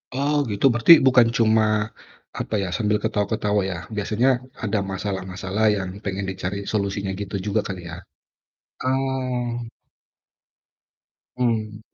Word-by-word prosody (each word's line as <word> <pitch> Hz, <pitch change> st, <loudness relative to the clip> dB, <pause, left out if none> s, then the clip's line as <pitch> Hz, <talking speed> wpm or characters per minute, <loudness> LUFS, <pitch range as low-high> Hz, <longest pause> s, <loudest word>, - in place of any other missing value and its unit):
Oh 145 Hz, +2 st, +1 dB, 0.2 s
gitu, 100 Hz, +6 st, 0 dB
berarti 120 Hz, +8 st, +8 dB
bukan 125 Hz, -3 st, +6 dB
cuma 110 Hz, -1 st, +4 dB, 0.8 s
apa -, -, -4 dB
ya, -, -, -2 dB
sambil 105 Hz, -2 st, +1 dB
ketawa-ketawa 105 Hz, -1 st, 0 dB
ya, 90 Hz, -, -4 dB, 0.2 s
biasanya 110 Hz, +5 st, +1 dB, 0.3 s
ada 105 Hz, -1 st, 0 dB
masalah-masalah 95 Hz, +1 st, -2 dB
yang 95 Hz, -1 st, -3 dB, 0.2 s
pengen 100 Hz, 0 st, -2 dB
dicari 95 Hz, +1 st, -4 dB
solusinya 100 Hz, -2 st, -1 dB
gitu 100 Hz, 0 st, -5 dB
juga 105 Hz, +1 st, +1 dB
kali 95 Hz, -3 st, -5 dB
ya? 85 Hz, -, -6 dB, 0.9 s
Oh. 130 Hz, -3 st, -1 dB, 1.7 s
Mmm. 110 Hz, -3 st, -1 dB
110 Hz, 115 wpm, -23 LUFS, 100-120 Hz, 1.7 s, berarti